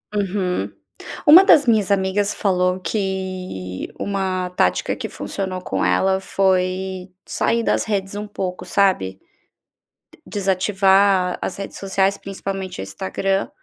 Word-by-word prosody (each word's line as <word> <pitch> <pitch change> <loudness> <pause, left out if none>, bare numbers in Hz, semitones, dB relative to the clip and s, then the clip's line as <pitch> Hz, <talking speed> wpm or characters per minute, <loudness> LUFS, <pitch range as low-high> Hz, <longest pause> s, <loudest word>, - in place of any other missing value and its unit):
Uhum. 195 -2 -1 0.6
Uma 320 +5 +10
das 300 -7 +6
minhas 215 -5 +2
amigas 200 +1 +1
falou 180 -2 +1
que 185 - -4
uma 190 -2 -2
tática 180 - +1
que - - -6
funcionou 190 -2 -5
com - - -2
ela 190 0 +2
foi 185 -1 0 0.2
sair 230 0 0
das - - +1
redes 200 -2 -2
um 210 +1 -5
pouco, 185 -3 -4
sabe, 180 - +1 0.9
d - - -19
desativar 195 -1 +2
as - - -4
redes 195 - -6
sociais, 195 0 0
principalmente 195 - -5
o - - -4
Instagram, 100 - -2
190 Hz, 125 wpm, -21 LUFS, 185-200 Hz, 0.9 s, Uma